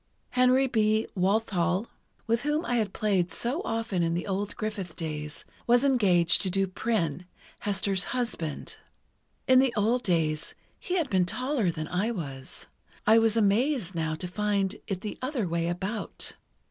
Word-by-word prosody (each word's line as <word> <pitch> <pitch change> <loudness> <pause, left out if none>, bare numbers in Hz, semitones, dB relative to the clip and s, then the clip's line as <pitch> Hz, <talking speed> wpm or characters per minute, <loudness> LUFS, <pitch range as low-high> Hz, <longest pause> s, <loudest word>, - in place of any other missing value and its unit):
Henry 255 +1 +4
B. 220 -3 +2
Walthall, 190 -1 +1 0.4
with 230 0 +1
whom 300 +4 0
I 245 - +1
had 215 -4 0
played 190 -5 +1
so 260 +9 0
often 225 -5 -1
in 165 0 +1
the 175 - -2
old 200 +1 -2
Griffith 210 -6 -4
days, 150 -1 -5 0.2
was 240 +2 +5
engaged 190 -11 +4
to 190 - 0
do 195 +1 +1
Prynne, 185 -4 -2 0.3
Hester's 195 -1 0
husband. 230 - -3 0.7
In 255 0 +7
the 265 -1 +4
old 230 +4 +2
days, 160 -6 0 0.2
he 365 - -3
had 315 -8 -1
been 185 -2 +3
taller 250 -3 0
than 155 -2 -3
I 190 +6 0
was. 140 - -5 0.4
I 220 +2 +7
was 225 0 +2
amazed 220 - +2
now 160 -2 -1
to 180 +3 -5
find 200 0 0
it 190 -2 -3
the 210 - -6
other 255 -6 -1
way 170 0 -1
about. 190 +5 -3
205 Hz, 160 wpm, -28 LUFS, 175-235 Hz, 0.7 s, In